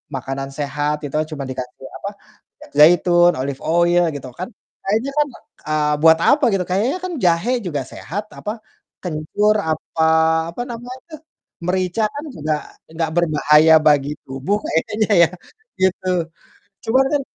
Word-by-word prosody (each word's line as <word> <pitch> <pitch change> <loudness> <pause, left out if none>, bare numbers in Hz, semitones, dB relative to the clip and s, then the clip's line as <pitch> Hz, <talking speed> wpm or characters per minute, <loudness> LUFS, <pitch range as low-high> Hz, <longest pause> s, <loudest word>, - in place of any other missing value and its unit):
makanan 135 +1 -4
sehat 145 +1 -1
itu 145 - -6 0.2
cuma 145 -3 -5
dikasih 130 0 -7
apa 200 - -5 0.4
minyak - - -17
zaitun, 175 +2 +6
olive 135 +1 -4
oil 175 +1 +3
gitu 135 -2 -7
kan, 185 - -3 0.4
kayaknya 225 +7 0
kan 295 - +3 0.4
eee 155 -1 +1
buat 160 0 +7
apa 290 +1 +3
gitu 190 -2 +1
kayaknya 210 - +1
kan 365 - -4
jahe 170 +7 +2 0.2
juga 145 -5 -2
sehat 200 +6 -5 0.2
apa 210 - -4 0.5
kencur 180 +6 0 0.2
apa 155 +1 -4 0.5
apa 170 - -6
namanya 245 +2 -8
tuh, 310 -2 -9 0.5
merica 185 +3 0
kan 290 - -5
juga 155 +1 -1 0.4
nggak 165 -1 -1
berbahaya 155 -1 +4
bagi 145 -2 +4 0.2
tubuh 135 +10 -2
kayaknya 210 +7 -1
ya - - +5 0.5
gitu. 190 0 +1 0.8
Cuma 255 +4 +3
kan 290 -1 +1
170 Hz, 140 wpm, -20 LUFS, 150-205 Hz, 0.8 s, buat